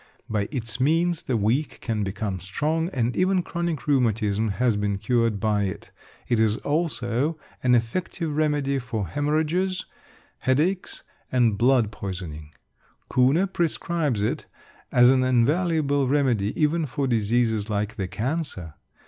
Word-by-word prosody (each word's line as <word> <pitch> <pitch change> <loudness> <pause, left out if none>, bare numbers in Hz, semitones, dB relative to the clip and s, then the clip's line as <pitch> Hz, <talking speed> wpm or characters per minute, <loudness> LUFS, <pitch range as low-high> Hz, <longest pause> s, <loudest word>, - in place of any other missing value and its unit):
By 105 -2 -1
its 120 -3 -3
means 165 +5 +2
the 125 - -1
weak 115 +9 0
can 110 -3 -2
become 100 0 -3
strong; 155 - -1
and 125 -6 -1
even 185 0 +2
chronic 170 -3 -3
rheumatism 110 -6 +1
has 120 0 +1
been 105 -1 -1
cured 115 0 +1
by 105 -2 +1
it. 95 - -6 0.4
It 120 - +1
is 110 0 +3
also 145 -1 -1 0.2
an 125 -1 +4
effective 150 +6 -2
remedy 145 -3 +1
for 115 -5 -3
haemorrhages, 160 +6 0 0.5
headaches, 160 +9 0 0.3
and 120 -4 +3
blood 120 -1 +3
poisoning. 90 -7 -6 0.6
Kuhne 135 +9 +4
prescribes 160 -8 0
it - - -2 0.4
as 125 0 +6
an 130 -1 +3
invaluable 145 +2 +2
remedy 125 -7 +1
even 155 +1 +2
for 140 +2 -2
diseases 110 -2 +1
like 105 +1 -1
the 95 -3 -2
cancer. 115 - -3
125 Hz, 130 wpm, -25 LUFS, 110-150 Hz, 0.6 s, as